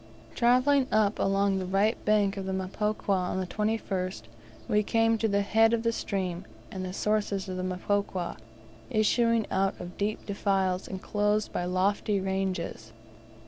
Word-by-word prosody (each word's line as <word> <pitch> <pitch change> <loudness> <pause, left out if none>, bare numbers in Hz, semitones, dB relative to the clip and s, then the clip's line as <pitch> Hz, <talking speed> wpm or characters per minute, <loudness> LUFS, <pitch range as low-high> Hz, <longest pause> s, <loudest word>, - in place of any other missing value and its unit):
Travelling 255 +3 +3
up 215 -1 +2
along 195 0 +2
the 185 - -3
right 200 +4 +2
bank 205 -2 +3
of 195 -1 -5
the - - -1
Mpokwa, 205 +3 -2
on 185 -1 +1
the 185 - -1
21st 195 - -2 0.4
we 210 - +3
came 225 +1 +2
to 225 - +2
the 200 -1 +1
head 225 +3 +4
of 230 -1 +1
the 230 - +2
stream, 185 -5 -3 0.3
and 185 - -5
the 185 - -4
sources 205 -1 -1
of 185 - -4
the 185 - -3
Mpokwa, 185 0 -2 0.5
issuing 230 0 +2
out 195 0 0
of 175 0 -9
deep 210 +1 -2
defiles 195 -2 0
enclosed 210 +2 -1
by 175 - -1
lofty 195 +3 +1
ranges. 190 -12 -3
200 Hz, 155 wpm, -28 LUFS, 185-215 Hz, 0.5 s, head